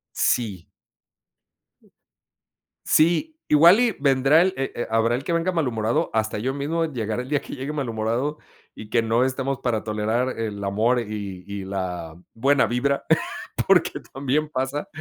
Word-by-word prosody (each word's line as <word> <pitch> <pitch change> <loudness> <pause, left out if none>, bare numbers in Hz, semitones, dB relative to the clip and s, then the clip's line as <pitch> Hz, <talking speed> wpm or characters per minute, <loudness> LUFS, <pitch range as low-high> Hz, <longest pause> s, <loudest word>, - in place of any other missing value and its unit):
Sí. 100 -8 0 2.2
Sí, 175 - +3
igual 170 +7 +7
y 245 -3 +3
vendrá 140 +3 +4
él, 185 0 0
eh 135 - -2
eh, 120 - -3
habrá 115 +1 +2
el 130 - -4
que 170 - -2
venga 170 +2 +1
malhumorado, 120 -9 0
hasta 110 -1 0
yo 130 +5 -2
mismo 155 +4 -1
llegará 120 -5 -3
el 130 - -11
día 145 -1 +1
que - - -8
llegue 140 +2 -5
malhumorado 120 +1 -2 0.4
y 110 0 -11
que 115 - +3
no 115 +2 +2
estemos 135 +1 -2
para 115 -5 -1
tolerar 110 +4 -1
el 105 -3 -4
amor 110 +5 +1
y 100 -5 -6
y 100 0 -5
y - - -7
la 90 -4 -4 0.2
buena 135 +1 +3
vibra 135 +5 0 0.6
porque - - +3
también 140 +3 -1
pasa 135 +1 -3
125 Hz, 155 wpm, -23 LUFS, 110-145 Hz, 2.2 s, igual